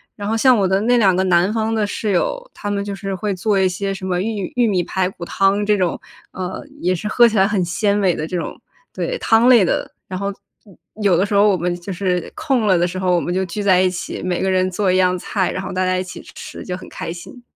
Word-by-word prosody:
然 205 Hz, -1 st, -5 dB
后 220 Hz, -, 0 dB
像 250 Hz, +2 st, +5 dB
我 195 Hz, -, +2 dB
的 190 Hz, +2 st, +1 dB
那 245 Hz, +2 st, +3 dB
两 195 Hz, -6 st, +4 dB
个 190 Hz, -, +1 dB
南 185 Hz, +2 st, +3 dB
方 225 Hz, 0 st, 0 dB
的 215 Hz, -2 st, 0 dB
室 210 Hz, +1 st, -2 dB
友， -, -, -1 dB
他 205 Hz, -, -5 dB
们 200 Hz, -1 st, -1 dB
就 200 Hz, 0 st, -5 dB
是 195 Hz, 0 st, -4 dB
会 205 Hz, +2 st, -2 dB
做 200 Hz, +3 st, 0 dB
一 190 Hz, -1 st, +3 dB
些 195 Hz, +2 st, -3 dB
什 190 Hz, -, -9 dB
么 180 Hz, -1 st, -1 dB
玉 205 Hz, -2 st, -3 dB
玉 240 Hz, -1 st, +4 dB
米 185 Hz, -4 st, +1 dB
排 185 Hz, +1 st, -1 dB
骨 185 Hz, -2 st, -8 dB
汤 195 Hz, +3 st, +1 dB
这 210 Hz, 0 st, +3 dB
种， 180 Hz, -3 st, 0 dB, 0.4 s
呃， 185 Hz, -1 st, -5 dB, 0.2 s
也 180 Hz, +1 st, +1 dB
是 185 Hz, +4 st, -4 dB
喝 240 Hz, +3 st, +5 dB
起 225 Hz, -3 st, +2 dB
来 190 Hz, -, +5 dB
很 200 Hz, -3 st, 0 dB
鲜 200 Hz, +4 st, 0 dB
美 190 Hz, -4 st, +2 dB
的 155 Hz, -, -4 dB
这 180 Hz, -, -5 dB
种， 175 Hz, -, -4 dB, 0.3 s
对， -, -, -2 dB
汤 225 Hz, +2 st, +4 dB
类 245 Hz, -5 st, +7 dB
的。 175 Hz, -, -1 dB, 0.2 s
然 185 Hz, 0 st, -4 dB
后 200 Hz, -, -2 dB, 0.4 s
有 195 Hz, -5 st, -18 dB, 0.4 s
有 -, -, +4 dB
的 185 Hz, -, +2 dB
时 205 Hz, -, -4 dB
候 200 Hz, +1 st, +5 dB
我 200 Hz, -, +4 dB
们 175 Hz, 0 st, -1 dB
就 180 Hz, +2 st, -6 dB
是 180 Hz, -2 st, -1 dB
空 250 Hz, -6 st, 0 dB
了 190 Hz, -3 st, +4 dB
的 175 Hz, -, +2 dB
时 180 Hz, +1 st, -4 dB
候， 180 Hz, -1 st, +2 dB
我 170 Hz, -, +1 dB
们 175 Hz, -, -2 dB
就 190 Hz, +1 st, 0 dB
聚 195 Hz, +4 st, -4 dB
在 190 Hz, -2 st, +4 dB
一 185 Hz, 0 st, +3 dB
起， 180 Hz, 0 st, -5 dB
每 180 Hz, -1 st, -2 dB
个 190 Hz, -, +1 dB
人 185 Hz, 0 st, +2 dB
做 185 Hz, +1 st, 0 dB
一 185 Hz, -, +2 dB
样 185 Hz, -1 st, +3 dB
菜， 190 Hz, +1 st, -1 dB
然 185 Hz, -, -4 dB
后 -, -, -5 dB
大 185 Hz, 0 st, 0 dB
家 185 Hz, 0 st, +1 dB
一 185 Hz, -, -1 dB
起 185 Hz, -, -9 dB
吃， -, -, -9 dB
就 180 Hz, -, -3 dB
很 185 Hz, -, -10 dB
开 165 Hz, -, -5 dB
心。 180 Hz, +8 st, -11 dB
190 Hz, 300 characters per minute, -19 LUFS, 180-210 Hz, 0.4 s, 类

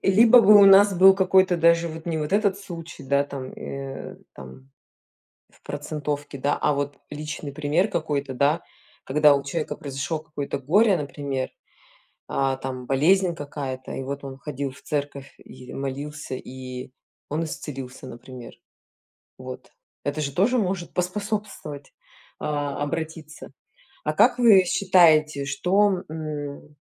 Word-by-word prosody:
либо 225 Hz, +5 st, +7 dB
бы 210 Hz, 0 st, +7 dB
у 200 Hz, -, +8 dB
нас 195 Hz, 0 st, +7 dB
был 190 Hz, +2 st, +8 dB
какой-то 190 Hz, -1 st, +3 dB
даже 170 Hz, 0 st, +3 dB
вот, 160 Hz, +1 st, -9 dB
не 165 Hz, -2 st, -1 dB
вот 150 Hz, +4 st, -3 dB
этот 200 Hz, -2 st, +2 dB
случай, 170 Hz, -4 st, -9 dB
да, 140 Hz, +1 st, +1 dB
там, 135 Hz, -2 st, -7 dB
э, 135 Hz, -1 st, -7 dB, 0.2 s
там 65 Hz, 0 st, -13 dB, 0.8 s
в -, -, -27 dB
процентовке, 145 Hz, -1 st, -4 dB
да, 140 Hz, +2 st, 0 dB
а 150 Hz, -, +2 dB
вот 145 Hz, 0 st, -3 dB
личный 150 Hz, -1 st, -6 dB
пример 155 Hz, +8 st, 0 dB
какой-то, 140 Hz, -7 st, -2 dB
да, 145 Hz, +6 st, +2 dB, 0.4 s
когда 150 Hz, +1 st, +5 dB
у 140 Hz, -, -2 dB
человека 155 Hz, +3 st, -3 dB
произошло 140 Hz, +3 st, -4 dB
какое-то 150 Hz, -3 st, -5 dB
горе, 195 Hz, -, +4 dB
например, 140 Hz, -2 st, -4 dB, 0.8 s
а, 135 Hz, -1 st, 0 dB
там 130 Hz, -1 st, -6 dB
болезнь 170 Hz, +6 st, +3 dB
какая-то, 140 Hz, -4 st, -6 dB
и 135 Hz, -, -4 dB
вот 140 Hz, +1 st, -5 dB
он 135 Hz, 0 st, -8 dB
ходил 140 Hz, -1 st, -4 dB
в -, -, -17 dB
церковь 140 Hz, -2 st, -4 dB
и 125 Hz, 0 st, -13 dB
молился, 140 Hz, +1 st, -5 dB
и 130 Hz, 0 st, -8 dB, 0.4 s
он 160 Hz, +3 st, -1 dB
исцелился, 135 Hz, -4 st, -7 dB
например. 125 Hz, -1 st, -10 dB, 0.8 s
Вот, -, -, -9 dB, 0.4 s
это 145 Hz, +2 st, -2 dB
же 140 Hz, -1 st, -2 dB
тоже 235 Hz, -, +2 dB
может 185 Hz, -4 st, -2 dB
поспособствовать, 190 Hz, -6 st, -4 dB, 0.5 s
а, 145 Hz, -1 st, -3 dB
обратиться. 155 Hz, +1 st, -5 dB, 0.5 s
А -, -, 0 dB
как 250 Hz, -, +4 dB
вы 210 Hz, -6 st, +7 dB
считаете, 155 Hz, -7 st, +4 dB
что, 185 Hz, +7 st, +1 dB
м, 150 Hz, -2 st, -6 dB
150 Hz, 140 wpm, -24 LUFS, 140-175 Hz, 0.8 s, у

